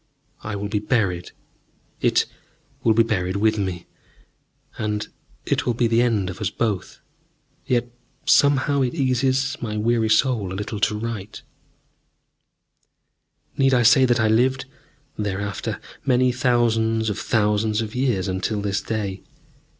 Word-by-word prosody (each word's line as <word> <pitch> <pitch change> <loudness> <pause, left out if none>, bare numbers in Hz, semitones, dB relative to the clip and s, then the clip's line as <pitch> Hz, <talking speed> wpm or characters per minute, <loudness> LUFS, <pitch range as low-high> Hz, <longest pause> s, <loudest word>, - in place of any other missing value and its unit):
I 105 -1 -5
will 100 0 -3
be 105 0 -1
buried, 100 -6 0 0.7
it - - +2 0.6
will 110 -2 +4
be 115 - +5
buried 95 -4 -1
with 110 +1 +2
me; 95 -3 -3 0.9
and 105 -1 -2 0.4
it - - -1
will 120 - +1
be 120 - +1
the 115 +1 +3
end 110 -6 +1
of 95 - -11
us 100 - 0
both. 105 -6 -3 0.7
Yet, 120 -1 0 0.3
somehow, 140 0 +4
it 130 +3 0
eases 135 0 +1
my 105 -3 -3
weary 110 +1 +1
soul 110 -6 +2
a - - -4
little 105 +2 -4
to 105 - +1
write.... 110 -2 -6 2.1
Need 135 -1 +4
I 120 - +3
say 125 +3 +6
that 120 -1 +2
I 110 - +3
lived, 130 +5 +2 0.5
thereafter, 100 -1 -3 0.2
many 125 -1 +3
thousands 115 -3 +1
of 100 - -4
thousands 105 0 +1
of 110 - -7
years, 125 -7 0
until 95 +3 -2
this 100 -1 -1
day? 100 -4 -3
110 Hz, 140 wpm, -22 LUFS, 105-125 Hz, 2.1 s, say